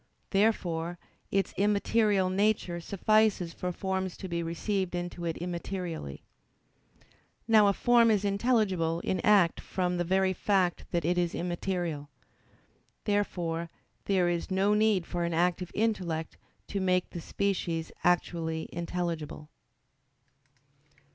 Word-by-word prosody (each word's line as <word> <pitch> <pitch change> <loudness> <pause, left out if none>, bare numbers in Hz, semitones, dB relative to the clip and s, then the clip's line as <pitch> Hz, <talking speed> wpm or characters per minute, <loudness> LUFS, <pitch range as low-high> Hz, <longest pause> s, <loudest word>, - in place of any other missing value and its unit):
Therefore 175 -5 +1 0.3
its 195 0 0
immaterial 205 -1 +2
nature 195 -3 +1
suffices 200 -2 +2
for 180 - -3
forms 190 0 -3
to 190 - -6
be 170 -1 -2
received 180 +2 -2
into 175 0 -4
it 165 -1 -2
immaterially. 175 - -5 1.2
Now 215 -2 +6
a 200 - +4
form 240 +1 +4
is 210 -2 +2
intelligible 195 -6 +1
in 185 - -1
act 195 -3 +4
from 180 -1 -1
the 175 - +1
very 190 +2 +2
fact 185 -2 +1
that 170 -3 -1
it 175 +1 +2
is 175 -1 0
immaterial. 175 -4 -3 0.9
Therefore 175 -5 -1 0.4
there 185 -3 +2
is 175 +1 -1
no 195 +2 +2
need 210 -4 +3
for 175 0 -3
an 170 -1 -1
active 175 +1 +1
intellect 180 -8 -1 0.3
to 200 - -2
make 185 -1 +1
the 170 - -6
species 170 -4 -2
actually 165 -2 0
intelligible. 170 -3 -4
180 Hz, 120 wpm, -29 LUFS, 170-200 Hz, 1.2 s, Now